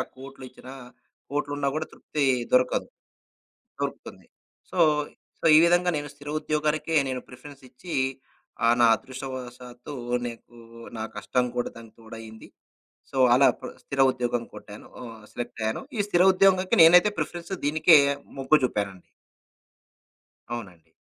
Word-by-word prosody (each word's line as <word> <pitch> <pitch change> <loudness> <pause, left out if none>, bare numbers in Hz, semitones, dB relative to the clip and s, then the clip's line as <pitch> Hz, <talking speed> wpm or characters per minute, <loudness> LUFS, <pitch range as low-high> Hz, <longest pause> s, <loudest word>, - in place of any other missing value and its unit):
ఆ - - +2
కోట్లు 135 0 -11
ఇచ్చినా 130 +1 -13 0.6
కోట్లున్నా 145 -1 -2
కూడా 155 0 -2
తృప్తి 150 -2 -3 0.3
దొరకదు. 125 0 +2 0.9
దొరుకుతుంది. - - -6 0.5
సో, - - -7 0.6
సో, - - -7
ఈ - - +9
విధంగా 175 +1 +3
నేను 145 0 -5
స్థిర 145 0 -11
ఉద్యోగాలకే 155 +1 -1
నేను 130 -1 -3
ప్రిఫరెన్స్ 140 +2 -13
ఇచ్చి 165 +7 -9 0.7
ఆహ్, 115 +1 +5
నా - - +7
అదృష్టవాసాతు 125 0 -9 0.3
నీకు 120 0 -9 0.4
నా 110 - -3
కష్టం 125 -1 -1
కూడా 120 - -1
దానికి 115 -1 -13
తోడయింది. 110 0 -11 0.6
సో, 135 - -4 0.2
అలా 135 +2 +5
ప్ర - - -7
స్థిర 140 - -4
ఉద్యోగం 120 -1 -2
కొట్టాను. 105 0 -11
ఆహ, 115 -2 -9 0.2
సెలెక్టయ్యాను. 115 -2 -4 0.2
ఈ - - +1
స్థిర 175 -3 +3
ఉద్యోగానికి 185 0 +3
నేనైతే 180 +5 +7
ప్రిఫరెన్స్ 175 +1 -4
దీనికే 160 +2 +6 0.4
మొగ్గు 135 +3 +4
జూపానండి. 100 -6 -2 1.5
అవునండి. 90 -8 -10
130 Hz, 125 wpm, -25 LUFS, 120-155 Hz, 1.5 s, ఈ